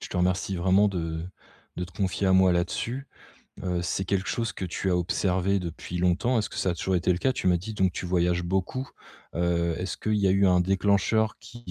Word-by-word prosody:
Je - - -7
te - - -5
remercie 90 +1 0
vraiment 95 +4 +4
de 80 -4 -3 0.5
de 90 - -2
te 90 - -14
confier 95 +1 -1
à 95 - +4
moi 95 -1 +5
là-dessus. 115 +9 -2 0.6
Heu, 90 -2 -1
c'est 90 +2 -1
quelque 95 +1 -1
chose 115 -1 -1
que 95 - -5
tu 90 +2 -2
as 90 - +3
observé 95 +2 +1
depuis 85 0 -6
longtemps. 90 +8 +2
Est-ce 105 - -1
que - - -9
ça 95 - +1
a - - -1
toujours 95 +2 0
été 90 +1 +2
le 90 - -2
cas? 130 +7 +1
Tu 110 - -4
m'as 90 -1 +4
dit, 110 +5 -7
donc, 95 -3 +2
tu 90 - -5
voyages 90 0 +1
beaucoup. 95 +9 -2 0.5
Heu, 85 -1 +1
est-ce 90 0 -3
qu'il 110 - -1
y 100 -1 +2
a - - +4
eu 100 +1 +4
un 90 -1 +4
déclencheur 100 +4 +2
qui 120 +1 -11
95 Hz, 230 wpm, -27 LUFS, 90-100 Hz, 0.6 s, moi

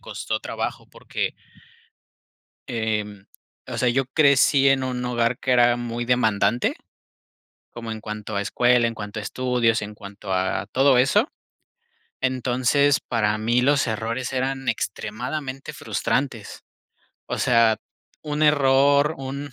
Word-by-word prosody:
costó - - -4
trabajo - - -5
porque - - -4 1.3
em, 105 -3 -3 0.4
o - - -6
sea, 125 - +1
yo 135 +2 +1
crecí 140 -1 +4
en 135 -1 +2
un 125 -1 -3
hogar 120 0 0
que 130 - -1
era 120 -1 +5
muy 120 0 -4
demandante. 110 -2 +1 1.0
Como 115 -1 -7
en 110 - -7
cuanto 105 0 -6
a - - +1
escuela, 120 +3 +3
en 115 - -6
cuanto 105 0 -6
a - - -7
estudios, 120 0 0
en 105 0 -6
cuanto 100 -1 -8
a 95 +1 -1
todo 135 -1 +4
eso. 205 - +3 0.9
Entonces, 130 +2 +2
para 105 -2 0
mí 120 +3 +1
los 140 +1 +3
errores 115 +3 -3
eran 135 0 -2
extremadamente 130 +7 -4
frustrantes. 130 -6 -3 0.6
O - - -3
sea, 115 -3 +4 0.5
un 150 0 -2
error, 140 0 +4
un 135 +1 -6
125 Hz, 130 wpm, -23 LUFS, 110-135 Hz, 1.3 s, era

